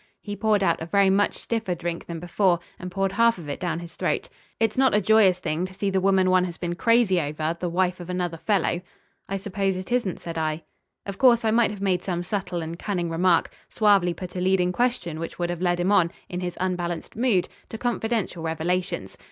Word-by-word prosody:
He 205 -1 -6
poured 210 -2 +2
out 170 -3 +1
a 160 - -4
very 200 +1 +4
much 205 +1 +2
stiffer 225 -6 -2
drink 170 0 -4
than 170 -1 -5
before, 175 +1 +1 0.2
and 180 - -6
poured 195 +1 -1
half 230 +2 +3
of 165 -4 -9
it 145 - -4
down 170 -3 -2
his 170 -1 -8
throat. - - -1 0.3
"It's 225 -2 +1
not 265 -4 +3
a - - +5
joyous 205 -2 +5
thing 160 0 -2
to 185 - -13
see 200 0 -1
the 190 0 +1
woman 190 -1 +3
one 185 0 +4
has 170 -2 -6
been 175 -1 -3
crazy 215 -1 +3
over 155 +2 -2
the 180 - -2
wife 180 +1 0
of 175 0 -8
another 180 -2 -2
fellow." 180 -2 0 0.5
"I 195 - -1
suppose 195 -1 -1
it 185 +5 -7
isn't," 240 -7 0
said 165 -1 -5
I. 155 0 -2 0.4
Of 200 -1 -6
course 240 -3 +5
I 220 - +3
might 230 +1 +4
have 205 -2 -7
made 185 -2 +1
some 175 -2 -2
subtle 180 -2 -3
and 165 +2 -6
cunning 175 -5 -2
remark, 170 0 +2 0.2
suavely 200 -5 +3
put 180 -1 -8
a 180 - -2
leading 185 -1 +2
question 210 -7 -1
which 165 - -6
would 175 0 -1
have 175 0 -5
led 175 -1 +1
him 180 +3 +1
on, 185 -5 +4 0.2
in 180 - -4
his 180 -1 -4
unbalanced 175 -2 -3
mood, 225 -6 +2 0.2
to 225 - -6
confidential 225 -6 -1
revelations. 160 - -2
185 Hz, 225 wpm, -25 LUFS, 175-200 Hz, 0.5 s, a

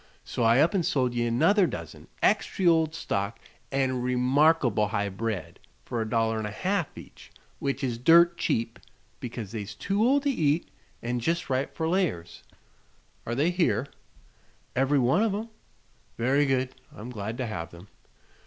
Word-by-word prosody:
So - - -5
I 115 +1 +5
up 165 - +3
an' 195 - +2
sold 130 -6 0
ye 120 0 0
another 165 - +3
dozen, - - -8 0.2
extry 190 - +1
ol' 160 -2 +4
stock 105 -10 -3 0.3
an' 130 -2 0
remarkable 125 -2 +3
high 100 -1 -1
bred, 100 -2 -4 0.3
fer 120 - -3
a 110 - -3
dollar 115 -1 +1
an' 110 - -3
a - - -6
half 185 - -2
each. - - -13 0.3
Which 140 0 -2
is 120 -3 -2
dirt 170 +6 +6
cheap 115 -7 -1 0.4
because 115 -5 -6
they's 105 -2 -6
too 200 - 0
old 275 +4 +3
to 285 - +2
eat 155 - 0 0.3
an' 120 +1 -1
jest 165 +5 -1
right 130 +1 0
fer 160 - -3
layers." 165 - -1 0.9
"Are 120 - -1
they 150 +7 +2
here?" 135 - +1 0.9
"Every 135 +3 +2
one 135 - +3
of 220 -3 +1
'em." 220 +3 -5 0.7
"Very 135 +5 +2
good. 130 -1 0 0.2
I'm 115 +4 -9
glad 110 0 -5
to 130 - -2
have 90 -7 -5
them. 85 +3 -14
130 Hz, 165 wpm, -27 LUFS, 115-165 Hz, 0.9 s, dirt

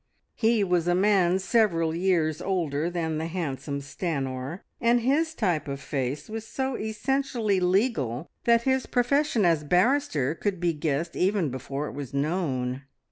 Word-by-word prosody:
He 225 -2 +2
was 180 -3 +1
a 175 - +3
man 190 -2 +3
several 190 -5 +2
years 170 -3 +1
older 170 -5 -1
than 160 -3 -2
the 160 - -2
handsome 145 -5 -3
Stanor, 140 0 -4 0.2
and 235 0 +3
his 315 +6 +1
type 175 -9 0
of 140 -1 -4
face 135 0 -3
was 220 0 -6
so 265 +1 -2
essentially 220 -2 0
legal 180 - +1 0.2
that 235 0 +4
his 265 0 +1
profession 250 -2 +2
as 165 -3 +3
barrister 180 - +2
could 185 +2 -2
be 170 -1 +1
guessed 155 +1 -2
even 185 -6 +1
before 135 +3 -4
it - - -7
was 140 -2 -6
known. 140 -5 -1
175 Hz, 150 wpm, -26 LUFS, 150-220 Hz, 0.2 s, that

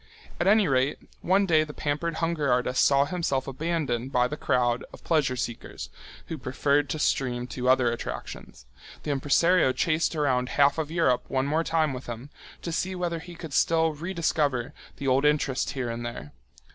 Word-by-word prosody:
At 175 - +1
any 210 0 +5
rate, 135 +1 +1 0.2
one 195 +3 +3
day 160 -4 +4
the 150 -1 -9
pampered 155 +3 -2
hunger 160 -4 0
artist 125 +1 +2
saw 140 0 +4
himself 145 -5 -1
abandoned 135 -4 -2
by 125 -1 +3
the 150 - -4
crowd 120 -4 +1
of - - -14
pleasure 150 -6 +1
seekers, 120 -2 -5 0.3
who 160 - -6
preferred 140 +2 +1
to - - -2
stream 125 -4 0
to 125 0 -1
other 130 -2 +4
attractions. 115 - -7 0.4
The 150 - -2
impresario 145 +3 +3
chased 165 +2 0
around 130 -4 +1
half 145 +2 +4
of 155 -2 -2
Europe 160 -7 +1
one 130 0 0
more 155 +3 +1
time 160 -3 +1
with 130 0 -7
him, 120 +4 -7 0.3
to 170 - -3
see 185 +3 -2
whether 175 -2 -2
he 175 +1 -11
could 165 -4 -8
still 160 +2 +3
re 165 +5 -5
discover 150 -6 0 0.2
the 140 - -4
old 130 +1 +3
interest 150 -3 +1
here 125 -4 -3
and 115 +1 -5
there. 120 -11 -6
145 Hz, 185 wpm, -26 LUFS, 130-165 Hz, 0.4 s, any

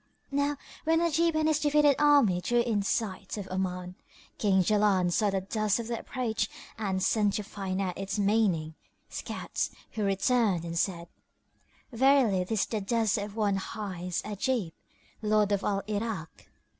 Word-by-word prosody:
Now, 285 +1 0 0.3
when 325 +1 +3
Ajib 335 0 +2
and 310 0 +2
his 310 -1 +2
defeated 295 -1 +4
army 280 -12 +5
drew 240 +5 +2
in 225 -4 0
sight 200 -1 -2
of 200 -2 -5
Oman, 180 -1 -3 0.5
King 190 -3 +3
Jaland 200 -3 +3
saw 210 +3 +2
the 195 -1 -1
dust 215 +2 0
of 230 0 -5
their 235 - -2
approach 220 -4 -2 0.3
and 190 -4 -2
sent 205 -2 +2
to 210 - -2
find 195 -2 -4
out 190 -2 -2
its 195 +1 -3
meaning, 200 -6 +1 0.4
scouts - - -3 0.2
who 215 - -3
returned 195 -2 +2
and 165 0 -5
said, 170 -1 -1 0.8
"Verily 245 -6 +4
this 210 +3 -1
is - - +2
the 215 -2 -3
dust 220 +1 +1
of 205 0 -6
one 205 -3 +1
hight 185 -4 -4
Ajib, 210 -2 -1 0.5
lord 210 -1 +2
of 200 -1 +1
Al 200 -1 0
Irak." 210 -5 -4
210 Hz, 160 wpm, -29 LUFS, 190-235 Hz, 0.8 s, army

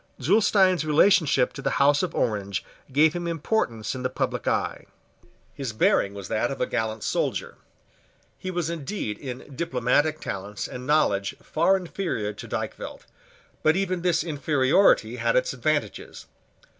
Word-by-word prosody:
Zulestein's 190 - +3
relationship 155 -3 +3
to 135 - -7
the - - -1
House 145 +1 +4
of 185 - -3
Orange 100 -5 -1 0.3
gave 150 +4 +4
him 175 -1 -3
importance 155 - -1
in 130 - -5
the 130 - -1
public 130 -1 -3
eye. - - -1 0.7
His 130 -5 -5
bearing 100 -2 +2
was 100 -2 -7
that 115 +3 0
of 135 - -5
a - - +1
gallant 110 -2 -2
soldier. - - -2 0.8
He 185 - -5
was 175 -3 -2
indeed 160 - -4
in 130 +1 -8
diplomatic 145 +1 +1
talents 100 +1 -5
and 125 0 -8
knowledge 100 -10 +2
far 180 +5 +2
inferior 170 - -3
to - - -9
Dykvelt: - - -5 0.6
but 155 +1 +3
even 185 -2 -1
this 170 -2 +2
inferiority 150 - +2
had - - +1
its - - +2
advantages. - - -2
145 Hz, 145 wpm, -25 LUFS, 120-175 Hz, 0.8 s, House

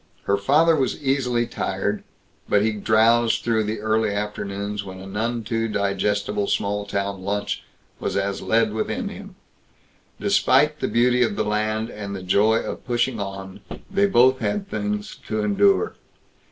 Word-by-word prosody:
Her 100 - +2
father 150 +11 +4
was 135 -4 0
easily 125 -3 +1
tired, - - -2 0.5
but 105 - +4
he 110 - +2
drowsed 110 +2 +3
through 110 -2 +1
the 105 0 -3
early 110 0 +1
afternoons 100 0 -3
when 95 -1 -9
a 95 - -9
none 115 +4 -2
too 115 0 -1
digestible 100 0 -1
small 100 0 -1
town 100 -1 -2
lunch 100 +1 -2 0.4
was - - -2
as 100 0 -1
lead 110 -1 +2
within 110 - -2
him. - - -10 0.8
Despite 150 +4 +3
the - - -1
beauty 125 +1 +3
of 110 -4 +2
the 110 - -1
land 110 +2 -1
and 100 -1 -6
the 95 - -7
joy 105 +5 +3
of - - -6
pushing 120 -1 0
on, 95 -1 -6 0.3
they 200 0 +3
both 130 -6 +4
had 205 -1 -2
things 210 +1 -3
to 110 -1 -1
endure. 195 - +3
110 Hz, 155 wpm, -23 LUFS, 100-120 Hz, 0.8 s, father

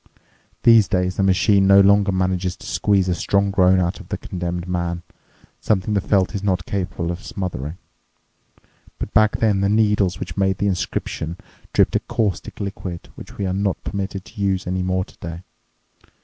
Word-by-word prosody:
These 115 -4 +7
days 90 0 0
the - - +1
machine 95 +1 +3
no 100 0 +7
longer 100 0 +5
manages 95 -1 0
to - - -14
squeeze 100 -2 +1
a 90 - +2
strong 100 +3 +1
groan 95 -1 +4
out 90 0 -1
of - - -12
the - - -3
condemned 90 -1 -4
man—something 90 +3 -3
the 100 - +2
felt 95 0 +1
is 100 - -3
not 90 -3 0
capable 90 -3 -3
of 90 +2 -7
smothering. 90 -5 -5 1.2
But - - -6
back 110 -1 +4
then 105 -4 +2
the 100 - +2
needles 105 -5 +2
which - - -6
made 95 -1 +1
the 100 - -1
inscription 90 -3 -2 0.3
dripped - - +3
a - - +4
caustic 105 -5 -2
liquid 95 -3 -6
which - - -12
we 100 - -2
are 95 - -1
not 100 0 -1
permitted 100 -1 -4
to 110 - -10
use 95 -1 0
any 90 +1 -1
more 95 0 0
today. 85 +1 -9
95 Hz, 175 wpm, -21 LUFS, 90-100 Hz, 1.2 s, These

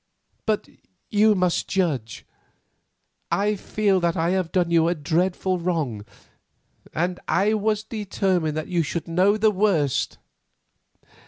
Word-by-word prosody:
But 215 -1 0 0.4
you 215 0 +4
must 180 -2 0
judge. 145 - -2 1.1
I 205 +1 +1
feel 200 -1 +1
that 170 0 0
I 165 +2 +1
have 185 -3 -1
done 175 -3 +1
you 165 -1 +4
a 175 - +1
dreadful 180 +4 0
wrong, 155 - -2 0.9
and 175 +3 -1
I 200 +4 +2
was 215 0 0
determined 190 -7 -1
that 155 - -3
you 175 -2 +1
should 165 +2 -3
know 185 +5 +3
the 215 0 +3
worst." 185 -9 +1
180 Hz, 130 wpm, -24 LUFS, 165-205 Hz, 1.1 s, you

